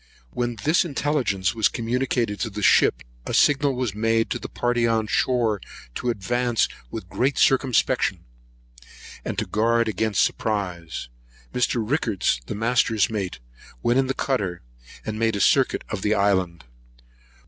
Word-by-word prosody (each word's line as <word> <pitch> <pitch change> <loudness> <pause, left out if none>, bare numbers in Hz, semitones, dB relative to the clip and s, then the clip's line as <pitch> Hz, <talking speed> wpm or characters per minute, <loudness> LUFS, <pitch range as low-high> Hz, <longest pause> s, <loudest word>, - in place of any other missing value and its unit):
When 120 -1 -2
this 160 +5 +3
intelligence 140 - 0
was 110 -2 +3
communicated 120 -2 -1
to 115 - -1
the 105 0 -6
ship, - - +4 0.2
a - - -1
signal 145 -2 +3
was 125 -5 -2
made 115 +1 +1
to - - -1
the - - -7
party 120 -1 0
on 110 -1 +1
shore 110 -2 +1 0.3
to 125 - -3
advance 120 +2 0 0.2
with - - -7
great 135 +3 0
circumspection, 130 -3 +2 1.0
and - - -4
to - - 0
guard 115 +2 +1
against 110 -1 +1
surprise. 90 - -2 0.5
Mr. 120 -2 0
Rickards, 110 - 0
the - - -4
master's 115 0 +2
mate, 100 -4 -3 0.5
went 120 +2 +3
in 135 - +1
the 135 - -2
cutter, 100 - -2 0.4
and 110 0 -4
made 115 -1 +1
a - - -2
circuit 135 +5 +3
of 110 - -4
the 105 +2 +1
island. 95 -4 +1
115 Hz, 150 wpm, -24 LUFS, 105-125 Hz, 1.0 s, ship